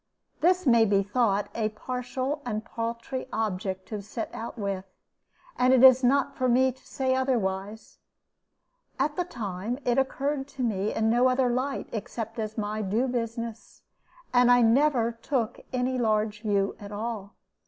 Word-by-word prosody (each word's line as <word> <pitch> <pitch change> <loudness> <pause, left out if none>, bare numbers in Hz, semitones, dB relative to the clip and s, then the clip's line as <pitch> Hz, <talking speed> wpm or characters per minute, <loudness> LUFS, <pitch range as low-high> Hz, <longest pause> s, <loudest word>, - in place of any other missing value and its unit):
This 365 +1 +3
may 235 -3 +6
be 200 -2 +3
thought 205 -1 +1
a 220 -2 0
partial 255 +5 -4
and 220 -2 -3
paltry 235 +3 -4
object 190 -3 -2
to 210 -2 -4
set 215 +3 -6
out 230 +2 -6
with; 200 -3 -2 0.8
and 255 +1 +5
it 255 - +4
is 260 0 +8
not 275 +2 +2
for 255 -1 +1
me 260 +2 +4
to 255 - -20
say 260 -1 0
otherwise. 220 -5 -2 1.0
At 295 0 0
the 360 - 0
time, 215 - -4
it 245 +1 +3
occurred 270 +1 -1
to 270 -2 -5
me 210 -3 0
in 220 0 +1
no 245 +2 +4
other 255 0 +2
light 265 +3 -2
except 225 +1 -5
as 215 0 -4
my 215 0 -2
due 215 +6 0
business, 230 -2 -5 0.5
and 245 0 +5
I 245 0 +6
never 240 0 +3
took 230 0 -2
any 255 0 0
large 215 -2 0
view 200 -3 0
at 205 0 -9
all. 210 -1 -5
235 Hz, 160 wpm, -27 LUFS, 215-255 Hz, 1.0 s, is